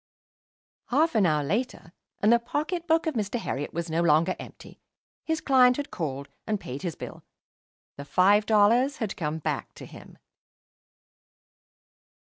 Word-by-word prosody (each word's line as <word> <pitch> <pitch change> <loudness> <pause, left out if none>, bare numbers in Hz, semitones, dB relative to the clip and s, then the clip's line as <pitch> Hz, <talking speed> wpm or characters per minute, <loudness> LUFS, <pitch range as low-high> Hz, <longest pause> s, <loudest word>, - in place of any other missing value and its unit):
Half 310 +6 +2
an 210 -5 +3
hour 150 -2 +1
later, 200 - -3 0.3
and 215 +3 +5
the 235 - +4
pocket 310 +8 -3
book 325 +1 +2
of 320 - -1
Mr. 215 -1 -2
Herriot 145 - -4
was 170 +1 -4
no 165 +1 0
longer 170 +2 +3
empty. - - -12 0.4
His 320 -1 -2
client 250 -2 +4
had 290 - -5
called 140 -4 -4 0.2
and 215 -2 -1
paid 135 -7 -7
his 175 -4 -4
bill. - - -9 0.7
The 140 - -7
five 200 +7 +3
dollars 230 +6 +3
had 220 -5 -3
come 155 -1 -3
back 160 - -4
to - - -10
him. - - -14
205 Hz, 150 wpm, -26 LUFS, 165-255 Hz, 0.7 s, and